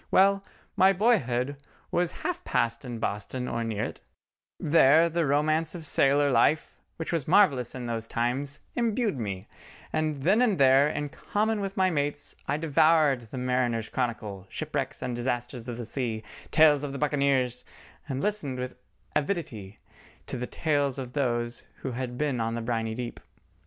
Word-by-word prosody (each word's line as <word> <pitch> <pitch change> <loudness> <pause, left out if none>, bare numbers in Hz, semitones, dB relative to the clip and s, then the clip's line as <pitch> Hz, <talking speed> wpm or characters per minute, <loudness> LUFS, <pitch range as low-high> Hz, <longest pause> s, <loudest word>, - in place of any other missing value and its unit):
Well, 195 +1 +4 0.3
my 190 +1 +5
boyhood 145 - +1 0.3
was 175 -1 +1
half 360 -2 -2
passed 115 -2 0
in 120 -3 -5
Boston 110 +4 -3
or 115 - -2
near 110 -2 -2
it; - - -5 0.6
there 160 +1 +5
the 170 -2 0
romance 155 +4 +1
of 165 -2 -6
sailor 145 0 +3
life, 140 +6 +2 0.2
which 160 +1 -4
was 160 -5 -1
marvellous 145 - +4
in 125 -1 -5
those 115 -1 -3
times, 130 +5 -1
imbued 230 - 0
me, 100 -4 -4 0.5
and 155 -3 -1
then 205 - +4
and 220 -6 +3
there 135 +1 +5
in 150 -1 -3
common 215 +7 -1
with 195 +1 -4
my 185 -1 +3
mates 145 -1 -2
I 140 - +1
devoured 155 -5 +3
the 130 - -7
Mariners' 125 -3 0
Chronicle, 105 -6 -3
Shipwrecks - - -3
and 125 -1 -2
Disasters 120 0 -3
of 120 - -4
the 120 - -5
Sea, 115 -3 -3 0.3
Lives 150 -2 +6
of 140 -1 -4
the - - -4
Buccaneers, 140 -4 +1 0.5
and 135 0 -2
listened 195 -11 -1
with 125 0 -5 0.4
avidity 135 - -2 0.5
to - - -5
the 125 +1 -3
tales 145 -4 0
of 125 -2 -6
those 120 -4 -1 0.2
who 135 - -2
had 125 0 -4
been 145 -4 0
on 115 +1 -1
the 115 - -3
briny 115 -1 -2
deep. 120 0 -5
135 Hz, 165 wpm, -27 LUFS, 120-155 Hz, 0.6 s, Lives